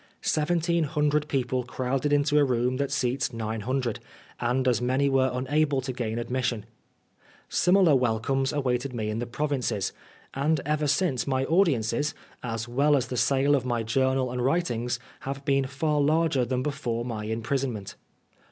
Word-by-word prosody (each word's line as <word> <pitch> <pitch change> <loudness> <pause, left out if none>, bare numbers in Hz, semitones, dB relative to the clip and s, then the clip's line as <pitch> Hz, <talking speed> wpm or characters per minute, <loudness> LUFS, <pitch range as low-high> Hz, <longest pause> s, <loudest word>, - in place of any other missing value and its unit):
Seven 160 +3 +1
teen 170 -1 +1
hundred 150 0 +1
people 130 -3 -1
crowded 130 +3 -2
into 145 +1 +3
a - - +5
room 125 -1 +1
that 140 0 -1
seats 130 -2 0
nine 110 -1 -4
hundred, 125 0 -1 0.4
and 125 +2 0
as 125 -1 +2
many 130 +3 +2
were 130 -1 +3
unable 140 +3 +1
to 130 0 -4
gain 115 -2 -3
admis 125 +2 -2
sion. 110 -4 -2 0.8
Similar 180 -4 +4
welcomes 130 +2 +1
awaited 130 -2 -1
me 110 -2 -2
in 110 - -3
the 120 - -3
provinces; 125 -6 -1 0.4
and 150 +3 +1
ever 150 0 0
since 145 -4 +1
my 130 -1 +1
audiences, 150 - +1 0.3
as 115 -1 -4
well 140 +4 +3
as 125 -2 -2
the 125 - -3
sale 135 +3 +3
of 135 - 0
my 120 -2 -1
journal 130 +2 +1
and 125 0 -2
writings, 125 -5 0 0.2
have 135 0 -6
been 135 -2 +2
far 145 +2 0
larger 150 -3 +2
than 130 +1 -1
before 120 -5 -2
my 110 -3 -4
imprisonment. 115 -1 -2
130 Hz, 165 wpm, -27 LUFS, 120-145 Hz, 0.8 s, a